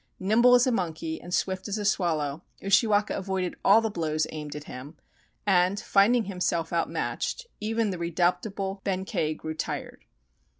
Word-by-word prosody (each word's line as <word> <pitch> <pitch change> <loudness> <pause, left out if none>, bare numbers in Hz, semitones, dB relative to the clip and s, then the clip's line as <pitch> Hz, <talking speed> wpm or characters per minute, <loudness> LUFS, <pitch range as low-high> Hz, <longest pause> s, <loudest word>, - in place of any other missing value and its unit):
Nimble 235 +6 +5
as 245 - +5
a 255 - +2
monkey 160 -6 -2
and 175 - -10
swift 185 +2 -1
as 205 +1 -2
a 210 - -3
swallow, 160 -6 0 0.2
Ushiwaka 205 +1 +3
avoided 190 -2 -2
all 210 +3 +6
the 225 -1 -1
blows 155 -4 -1
aimed 150 -2 -6
at 150 - -6
him, 140 +3 -10 0.5
and, 190 0 +3
finding 220 +6 +3
himself 180 -4 -2
outmatched, 170 - -2
even 220 0 0
the 180 - -5
redoubtable 180 +3 -1
Benkei 185 -5 -1
grew 155 - -5
tired. 155 - -5
185 Hz, 155 wpm, -27 LUFS, 165-205 Hz, 0.5 s, all